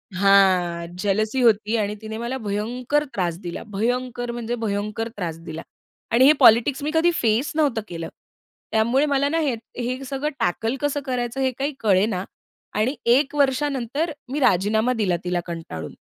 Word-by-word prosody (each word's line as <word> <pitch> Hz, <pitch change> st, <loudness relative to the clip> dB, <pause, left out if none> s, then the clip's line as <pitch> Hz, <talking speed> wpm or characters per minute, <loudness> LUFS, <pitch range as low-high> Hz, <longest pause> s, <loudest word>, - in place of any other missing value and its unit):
हां, 185 Hz, -3 st, +3 dB
जेलसी 215 Hz, +5 st, 0 dB
होती 220 Hz, -1 st, +3 dB
आणि 210 Hz, 0 st, -1 dB
तिने 220 Hz, 0 st, -6 dB
मला 240 Hz, +3 st, -3 dB
भयंकर 240 Hz, +7 st, -1 dB
त्रास 175 Hz, -3 st, -1 dB
दिला. 175 Hz, -1 st, -6 dB
भयंकर 245 Hz, +3 st, -2 dB
म्हणजे 240 Hz, 0 st, -3 dB
भयंकर 210 Hz, +2 st, -2 dB
त्रास 165 Hz, -4 st, -3 dB
दिला 160 Hz, -1 st, -7 dB, 0.5 s
आणि 255 Hz, +3 st, +6 dB
हे 300 Hz, -, +8 dB
पॉलिटिक्स 245 Hz, +5 st, +5 dB
मी 305 Hz, -, -1 dB
कधी 335 Hz, +2 st, +4 dB
फेस 230 Hz, +4 st, +1 dB
नव्हतं 280 Hz, -8 st, +1 dB
केलं. 165 Hz, -1 st, -6 dB, 0.6 s
त्यामुळे 235 Hz, +6 st, +3 dB
मला 280 Hz, -1 st, +1 dB
ना 330 Hz, +1 st, 0 dB
हे 285 Hz, -6 st, +1 dB, 0.2 s
हे 250 Hz, +2 st, -3 dB
सगळं 275 Hz, +3 st, -2 dB
टॅकल 225 Hz, +8 st, 0 dB
कसं 290 Hz, 0 st, 0 dB
करायचं, 250 Hz, 0 st, -2 dB
हे 260 Hz, -1 st, +2 dB
काही 285 Hz, +2 st, -1 dB
कळेना 195 Hz, -2 st, +2 dB, 0.6 s
आणि 255 Hz, +7 st, +1 dB, 0.2 s
1 285 Hz, +1 st, +1 dB
वर्षानंतर 280 Hz, +2 st, 0 dB, 0.2 s
मी 295 Hz, -, -1 dB
राजीनामा 220 Hz, +3 st, +2 dB
दिला 200 Hz, -6 st, +1 dB
तिला 180 Hz, 0 st, 0 dB
कंटाळून. 160 Hz, -, -6 dB
230 Hz, 155 wpm, -23 LUFS, 200-265 Hz, 0.6 s, हे